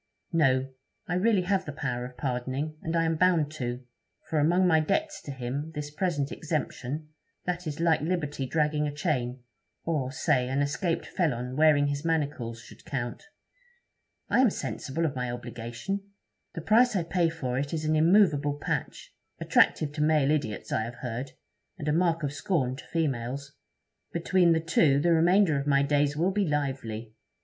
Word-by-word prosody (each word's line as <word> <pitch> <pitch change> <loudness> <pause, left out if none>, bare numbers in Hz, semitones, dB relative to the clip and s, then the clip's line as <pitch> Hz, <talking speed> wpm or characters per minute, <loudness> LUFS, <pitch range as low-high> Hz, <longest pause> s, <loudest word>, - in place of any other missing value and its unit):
'No; 135 -5 +3 0.4
I - - -2
really 195 +1 +3
have 190 +1 0
the 145 - -4
power 125 -4 -3
of 125 0 -10
pardoning, 130 +3 -2
and 165 +1 -3
I 165 - +3
am 160 0 0
bound 165 -4 +3
to; 125 -4 -4 0.4
for 155 - 0
among 175 +5 +3
my 160 -3 +5
debts 305 - -1
to 145 - -7
him, 135 +4 -4
this 145 0 -4
present 150 -4 -1
exemption, 150 -1 -3 0.4
that 180 -1 -3
is 150 0 -4
like 165 -2 +3
liberty 150 -5 -2
dragging 150 0 +1
a - - -2
chain, 130 -5 -2 0.4
or, 145 -6 -1
say, 135 -2 +1
an 135 +2 +1
escaped 165 +4 -1
felon 125 -8 -1
wearing 150 -1 +5
his 145 +1 -2
manacles, 145 -8 -1
should - - -15
count. 135 - -4 1.0
I - - +2
am 260 -2 +6
sensible 165 -4 -3
of 145 -3 -1
my 125 -1 -2
obligation. 120 - -5 0.5
The 165 - -4
price 230 +6 +4
I 180 - +1
pay 170 0 +1
for 130 -6 -3
it 145 +1 -3
is 155 -1 -2
an 155 0 +2
immovable 155 -4 +4
patch - - -4 0.3
attractive 150 -2 +3
to 150 0 -4
male 150 -2 +3
idiots, 145 -9 -2
I - - +1
have 115 +2 -5
heard, 125 +2 -5 0.4
and 155 -4 -6
a 150 - +2
mark 165 -1 +2
of 140 -1 -1
scorn 140 -7 0
to - - -11
females. 140 -3 -2 0.6
Between 170 0 +3
the 160 - +1
two 155 -3 +3
the 170 +3 +3
remainder 170 -1 +4
of 140 - -4
my 140 -1 +4
days 145 0 +1
will 175 +5 +2
be 200 -1 0
lively. 130 -7 -3
150 Hz, 175 wpm, -28 LUFS, 135-165 Hz, 1.0 s, am